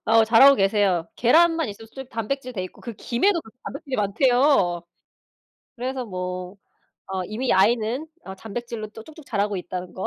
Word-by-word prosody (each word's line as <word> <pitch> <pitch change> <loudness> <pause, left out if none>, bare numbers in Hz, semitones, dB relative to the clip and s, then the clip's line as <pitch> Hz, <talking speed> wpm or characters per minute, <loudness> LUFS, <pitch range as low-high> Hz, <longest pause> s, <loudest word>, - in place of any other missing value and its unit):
어 225 0 +5
잘하고 255 +5 +7
계세요. 195 -5 +1
계란만 325 +3 +4
있어도 210 +2 -9
솔직 265 +3 -10
단백질 250 +3 -4
돼 185 -5 -4
있고 - - -12
그 235 - -7
김에도 335 - +1
그 220 - -16
단백질이 275 -2 -5
많대요. 215 - +2 0.9
그래서 255 +1 -3
뭐 180 -1 -5 0.5
어 190 -1 -3
이미 240 +5 -1
아이는 230 +8 +2 0.2
어 190 - -7
단백질로 225 +2 -6
또 220 +1 -12
쭉쭉 315 -2 -14
자라고 205 -2 -1
있다는 180 0 -6
거. 190 - -4
225 Hz, 345 characters per minute, -23 LUFS, 195-260 Hz, 0.9 s, 잘하고